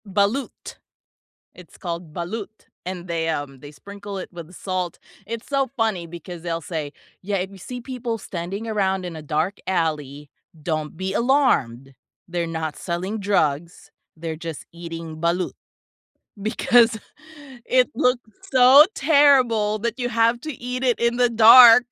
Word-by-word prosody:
Balut, 205 +7 -2 0.8
it's 180 -3 -16
called 170 -3 -6
balut, 205 +5 -6 0.2
and 180 -1 -6
they, 165 -1 -1
um, 145 -4 -4
they 145 - -10
sprinkle 200 +4 -9
it 185 - -6
with 170 0 -10
salt. 185 -2 -4 0.3
It's 230 0 -6
so 275 -2 0
funny 215 -7 0
because 170 +1 -9
they'll 165 -1 -3
say, 155 -2 -5 0.3
"Yeah, 200 +1 -2
if 190 +1 -3
you 195 - -12
see 245 +7 -7
people 240 -2 -4
standing 195 +2 -6
around 190 -3 0
in 175 -2 -6
a 160 - -7
dark 155 +6 -1
alley, 150 -5 -2 0.3
don't 155 -1 -3
be 190 +1 -3
alarmed. 140 - +1 0.3
They're 175 -1 -2
not 160 -2 -4
selling 185 +5 -4
drugs, 170 -5 -1 0.3
they're 160 0 -5
just 165 -1 -7
eating 165 -1 -8
balut," 170 +2 0 0.9
because 230 +2 +3 0.7
it 255 -1 +2
looks 250 -2 +1 0.2
so 260 +3 +8
terrible 260 -8 +4
that 235 +2 -3
you 245 -1 -1
have 230 0 +2
to 310 - -5
eat 250 +1 -5
it 245 -2 +2
in 235 0 +1
the 245 0 +3
dark, 230 +1 +9
190 Hz, 150 wpm, -22 LUFS, 165-235 Hz, 0.9 s, dark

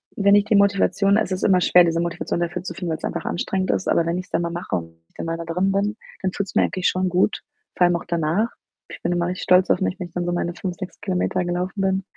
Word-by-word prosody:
wenn 200 0 +4
ich 205 0 +4
die 215 - +2
Motivation 200 0 +3
es 215 -4 0
ist 185 - -3
immer 185 -3 +4
schwer, 180 0 +6
diese 165 -1 +1
Motivation 170 0 -2
dafür 175 +1 -2
zu 175 - -5
finden, 175 -1 -4
weil's 160 - -4
einfach 170 -2 -3
anstrengend 185 +2 -1
ist, - - -1
aber 170 - +3
wenn 170 +1 -1
ich's 180 - -6
dann 165 - 0
mal 170 - -2
mache 170 - -3
und 80 -1 -8
ich - - -38
dann - - -5
mal 165 0 -2
da 170 - -5
drin 180 +4 0
bin, 205 +2 0 0.2
dann 190 -1 0
fühlt's 200 -1 -4
mir - - +5
eigentlich 185 -1 0
schon 185 0 +1
gut, 180 +4 +1 0.3
vor - - +2
allem 175 0 +3
auch - - -10
danach. 170 +6 0 0.4
Ich - - -10
bin - - -1
immer 175 0 0
richtig 180 +1 -4
stolz 180 +1 +4
auf - - +3
mich, 190 +1 -1
wenn 180 - -4
ich - - -25
dann 175 0 -2
so 175 - -1
meine 175 0 -1
5, 185 -2 -5
6 185 -2 -8
Kilometer 185 -1 0
gelaufen 180 +3 -2
bin, 190 0 +1
180 Hz, 280 wpm, -22 LUFS, 170-195 Hz, 0.4 s, schwer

